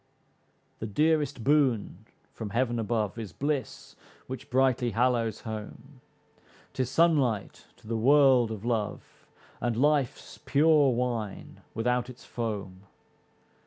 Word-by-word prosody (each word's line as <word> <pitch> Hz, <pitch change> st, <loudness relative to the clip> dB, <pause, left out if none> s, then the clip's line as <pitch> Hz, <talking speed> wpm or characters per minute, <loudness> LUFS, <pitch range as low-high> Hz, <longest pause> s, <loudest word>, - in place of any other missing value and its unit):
The 110 Hz, -, -4 dB
dearest 150 Hz, +2 st, +1 dB
boon 125 Hz, -, +1 dB, 0.3 s
from 110 Hz, -3 st, -6 dB
Heaven 120 Hz, +2 st, 0 dB
above, 110 Hz, -1 st, -1 dB
Is 110 Hz, -5 st, -6 dB
bliss 145 Hz, -1 st, -3 dB, 0.3 s
which 130 Hz, +2 st, -8 dB
brightly 130 Hz, -1 st, +2 dB
hallows 115 Hz, -2 st, +1 dB
home, 115 Hz, +5 st, -8 dB, 0.7 s
'Tis 130 Hz, -2 st, -1 dB
sunlight 135 Hz, -9 st, +1 dB
to -, -, -22 dB
the 115 Hz, -, -2 dB
world 130 Hz, 0 st, +5 dB
of 110 Hz, -1 st, -6 dB
love, 115 Hz, -4 st, -4 dB, 0.3 s
And 120 Hz, -2 st, -1 dB
life's 145 Hz, -1 st, 0 dB
pure 145 Hz, -1 st, +4 dB
wine 120 Hz, -4 st, -3 dB
without 125 Hz, +2 st, 0 dB
its 125 Hz, -, -12 dB
foam. 100 Hz, -5 st, -5 dB
120 Hz, 115 wpm, -28 LUFS, 110-135 Hz, 0.7 s, world